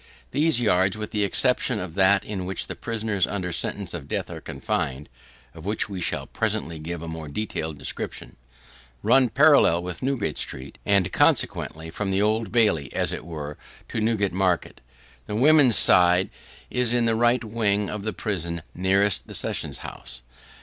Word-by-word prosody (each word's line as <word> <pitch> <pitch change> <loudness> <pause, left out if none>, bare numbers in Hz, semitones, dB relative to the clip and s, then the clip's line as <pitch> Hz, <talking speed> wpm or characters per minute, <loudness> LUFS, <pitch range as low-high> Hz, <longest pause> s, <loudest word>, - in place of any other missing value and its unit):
These 155 -3 +2
yards, 95 -3 +2
with 105 0 -5
the 105 -1 0
exception 125 +2 +2
of 90 -4 -6
that 95 +2 +3
in 95 -3 -5
which 95 0 -2 0.2
prisoners 110 -4 -1
under 90 -3 -3
sentence 100 +3 -2
of 80 -5 -6
death - - -3
are - - -8
confined 70 +2 -4 0.4
(of 80 - -12
which 105 +3 -1
we 95 -3 -5
shall - - -1
presently 80 -1 -3
give 85 +1 -6
a - - -6
more 80 -1 -6
detailed 80 -2 -4
description), 65 - -4 0.7
run 130 -2 +4
parallel 140 - +4
with 90 -1 -6
Newgate 130 -5 -1
street, 65 +1 -5
and 100 -2 +2
consequently 80 +1 +1
from 100 +3 -3
the 95 0 +1
Old 110 0 0
Bailey, 105 - +2
as - - -1
it - - -5
were, 75 -3 -7 0.3
to 110 - -3
Newgate 105 -4 0
market. 95 -2 -1 0.5
The 105 - -4
women's 135 -2 +5
side 90 +1 +6 0.4
is 125 -1 +3
in 120 -1 +2
the 115 - +2
right 120 +2 +2
wing 105 -2 0
of 105 - -5
the 110 +2 -3
prison 85 -7 -4
nearest 95 +2 +1
the - - -4
Sessions - - -1
house. 60 0 -9
100 Hz, 170 wpm, -24 LUFS, 85-110 Hz, 0.7 s, side